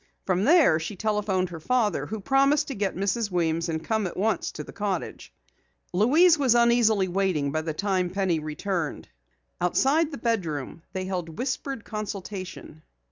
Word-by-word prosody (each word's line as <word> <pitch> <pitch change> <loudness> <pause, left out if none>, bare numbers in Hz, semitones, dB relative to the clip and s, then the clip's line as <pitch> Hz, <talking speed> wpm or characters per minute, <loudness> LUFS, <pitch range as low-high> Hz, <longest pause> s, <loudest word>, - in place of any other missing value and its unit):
From 185 +1 +1
there 300 - +5
she 170 +6 -5
telephoned 200 -3 0
her 170 -2 -7
father, 210 - 0
who 220 0 -5
promised 275 +5 +3
to - - -3
get 200 -4 -2
Mrs. 200 +4 -1
Weems 170 -2 0
and 160 0 -3
come 220 +2 0
at - - -8
once 205 -1 0
to 150 - -6
the - - -12
cottage. 205 -2 -4 0.6
Louise 300 - +5
was 255 -4 +3
uneasily 235 -4 +4
waiting 180 -6 0
by 155 +2 -1
the 160 -1 -4
time 185 -1 0
Penny 185 -3 0
returned. 155 - -3 0.5
Outside 275 - +2
the 285 - -7
bedroom 170 - -2
they 185 0 -3
held 180 -3 -4
whispered 260 0 -3
consultation. 195 -6 -6
195 Hz, 160 wpm, -26 LUFS, 175-230 Hz, 0.6 s, there